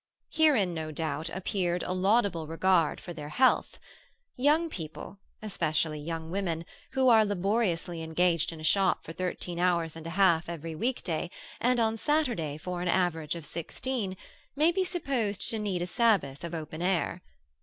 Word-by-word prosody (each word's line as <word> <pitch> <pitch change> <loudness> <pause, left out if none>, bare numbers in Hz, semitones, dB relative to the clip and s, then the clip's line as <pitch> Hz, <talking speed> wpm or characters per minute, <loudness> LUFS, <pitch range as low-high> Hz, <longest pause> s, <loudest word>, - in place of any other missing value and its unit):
Herein, 270 - +4
no 160 -1 -4
doubt, 155 +1 -3
appeared 180 -1 -1
a 185 - -2
laudable 190 -3 +2
regard 165 0 +2
for 175 - -8
their 150 -2 -7
health. 260 +11 +3 0.6
Young 300 +6 +3
people, 165 - -8 0.2
especially 155 -6 -1
young 160 +1 -5
women, 170 -4 -2 0.3
who 265 -1 +3
are 225 -2 +7
laboriously 195 -4 0
engaged 165 +1 +1
in 165 - -9
a - - -9
shop 190 +3 +3
for 165 - -7
thirteen 175 0 -4
hours 170 -3 +1
and 165 0 -8
a 165 +3 -6
half 170 -4 +4
every 165 -1 -5
weekday, 180 -5 -2 0.3
and 250 0 +2
on 225 -1 +2
Saturday 235 - 0
for 180 +2 -4
an 180 - -2
average 170 -3 +1
of 165 -3 -7
sixteen, 190 - -3 0.4
may 310 +4 +4
be 380 +2 +1
supposed 270 - -2
to 225 - -2
need 195 -4 -1
a - - -1
Sabbath 185 - +1
of 170 0 -4
open 155 0 -6
air. 180 -1 0
180 Hz, 165 wpm, -29 LUFS, 165-215 Hz, 0.6 s, are